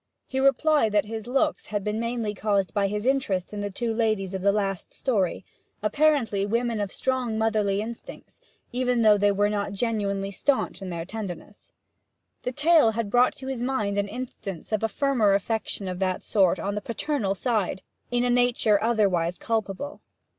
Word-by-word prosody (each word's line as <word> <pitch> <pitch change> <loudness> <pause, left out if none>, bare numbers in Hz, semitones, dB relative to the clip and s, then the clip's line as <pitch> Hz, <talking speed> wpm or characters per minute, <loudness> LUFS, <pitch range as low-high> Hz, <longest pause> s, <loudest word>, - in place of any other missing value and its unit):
He 265 - -3
replied 275 -3 +3
that 210 0 +3
his 220 +1 -6
looks 275 +5 0
had 205 -2 -2
been 210 +1 -2
mainly 230 -2 -2
caused 200 -2 0
by 200 -1 +2
his 210 +2 -3
interest 215 -9 0
in 205 - -4
the 205 0 -2
two 225 +3 -2
ladies 215 -4 0
of 190 - -3
the 200 +1 +4
last 195 -3 -2
story, 195 -8 0 0.4
apparently 240 -5 +2
women 230 +2 0
of 200 -2 -3
strong 255 -4 -1
motherly 215 -3 +1
instincts, 230 +1 -10 0.3
even 250 -1 +1
though 210 -1 +6
they 205 0 +4
were 205 +1 +2
not 205 -1 -2
genuinely 200 -3 -1
staunch 255 -2 0
in 190 - -5
their 170 -1 -4
tenderness. 205 -1 -8 0.7
The 250 - -2
tale 295 -4 +4
had 220 -2 -3
brought 245 +2 +4
to 265 - -8
his 265 -3 -3
mind 220 -6 -1
an 200 - 0
instance 205 -5 -7
of 215 - +1
a 225 - +2
firmer 230 -5 +2
affection 205 -1 -2
of 180 -1 -4
that 185 -1 -1
sort 190 -3 +3
on 200 - -3
the 210 - -3
paternal 230 -3 -1
side, 205 -4 -1 0.3
in 245 0 +1
a 245 - +2
nature 240 -4 +3
otherwise 190 -7 +1
culpable. 225 +5 -3
215 Hz, 180 wpm, -26 LUFS, 200-245 Hz, 0.7 s, though